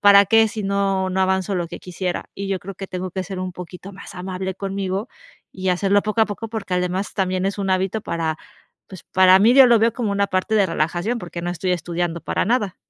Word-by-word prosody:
¿para 200 0 +8
qué? 225 +2 +5
Si 210 -1 -5
no 195 -1 0
no 190 +1 0
avanzo 190 +1 +1
lo 175 -2 -2
que - - -7
quisiera". 180 0 -4
Y 200 0 -5
yo 195 -1 0
creo 195 +1 -8
que 195 +1 -7
tengo 185 -1 -5
que 190 - -2
ser 190 0 -6
un 185 0 -4
poquito 180 +2 -9
más 195 0 -11
amable 185 +1 -4
conmigo 195 +2 -3 0.5
y 185 0 -3
hacerlo 195 +2 +2
poco 215 +1 -1
a - - +3
poco, 220 +2 -6
porque 200 -5 -4
además 180 +2 -1
también 185 -1 0
es 195 - -2
un 195 -1 -1
hábito 190 +3 0
para, 160 -4 -2 0.5
pues, 190 -3 -11
para 185 0 +5
mí 225 +5 +5
yo 265 -1 +8
lo 235 - +6
veo 230 0 +3
como 230 -5 -2
una 200 0 +2
parte 185 +4 0
de 200 - +4
relajación 175 +7 -1
porque 175 -2 -7
no 175 +1 -2
estoy 180 +1 -2
estudiando 170 -1 -3
para - - -1
nada. 210 -4 0
190 Hz, 235 wpm, -21 LUFS, 180-200 Hz, 0.5 s, para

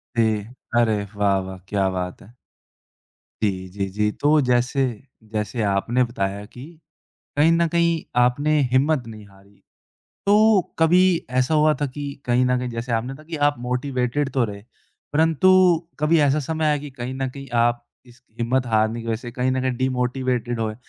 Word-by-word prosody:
जी। 115 - +3 0.5
अरे 110 -3 +2
वाह! 100 -1 +2
वाह! 95 0 -7
क्या 100 -2 +1
बात 90 -1 -4
है। 115 +5 -17 1.1
जी, 95 -2 -1
जी, 100 +1 -3
जी। 105 +2 0
तो 150 +5 +2
जैसे 125 +1 +1 0.5
जैसे 105 +2 -2
आपने 105 +6 +1
बताया 100 -4 -3
कि 125 +4 -12 0.7
कहीं 155 +3 +5
न 170 0 +3
कहीं 170 -1 +1 0.2
आपने 145 +5 +2
हिम्मत 135 -1 +2
नहीं 110 -2 -10
हारी। 100 +1 -22 0.6
तो 210 0 +5 0.2
कभी 165 +3 +5 0.4
ऐसा 130 +5 +2
हुआ 155 0 +4
था 145 - +1
कि 145 +2 -7 0.2
कहीं 125 +1 +3
न 125 0 +2
कहीं 125 0 -3
जैसे 115 +1 -4
आपने 120 +4 -1
कहा 155 +2 -14
कि 165 0 -6
आप 145 - -2
मोटिवेटेड 125 +2 -1
तो 130 -3 +2
रहे 100 -2 -7 0.5
परंतु 160 +4 +3 0.5
कभी 155 +2 +3
ऐसा 145 +1 +3
समय 160 +3 -2
आया 150 -1 +2
कि 145 0 -8
कहीं 130 0 -6
न 135 0 -2
कहीं 135 0 -10 0.2
आप 120 0 0 0.2
इस 120 0 -19 0.2
हिम्मत 125 +2 0
हारने 110 +1 +1
की 115 - -9
वजह 115 -1 0
से 120 +1 -8
कहीं 130 0 0
न 130 0 0
कहीं 130 -1 -1
डीमोटिवेटेड 125 -2 -1
हुए। 110 -1 -2
125 Hz, 175 wpm, -22 LUFS, 110-145 Hz, 1.1 s, कहीं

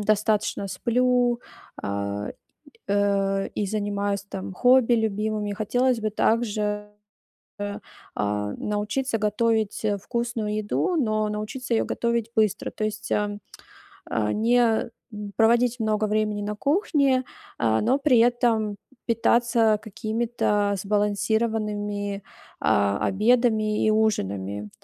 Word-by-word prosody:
достаточно 210 -1 +1
сплю, 245 +4 +1 0.4
а, 100 +1 -3 0.6
э, 200 -1 +1
и 205 - -1
занимаюсь, 205 -1 -1
там, 190 0 -6
хобби 250 +1 +5
любимыми, 215 -1 -1
хотелось 245 +4 +1
бы 215 -1 -1
также, 210 -2 0 1.3
а, 105 0 -1
научиться 210 +4 -1
готовить, 220 0 0
а, 205 -1 +1
вкусную 230 0 -3
еду, 215 - 0
но 215 -7 +1
научиться 215 +4 -4
её - - +2
готовить 235 -1 -1
быстро. 215 -3 +1
То 215 - -3
есть, 215 +1 -4
ам, 205 0 -1 0.7
а, 105 -2 0
не, 230 0 +2 0.2
м, 210 -1 -7
проводить 235 +2 +3
много 215 -1 +1
времени 210 0 0
на 210 0 -3
кухне, 280 - +2 0.3
а, 110 -1 +2
но 255 +5 +2
при 275 -4 +4
этом 230 -3 +2 0.3
питаться 230 -1 +3
какими-то 220 -1 -1
сбалансированными, 205 0 -1 0.4
а, 100 0 +2
обедами 215 0 +2
и - - +4
ужинами. 105 - -1
215 Hz, 110 wpm, -25 LUFS, 205-235 Hz, 1.3 s, хобби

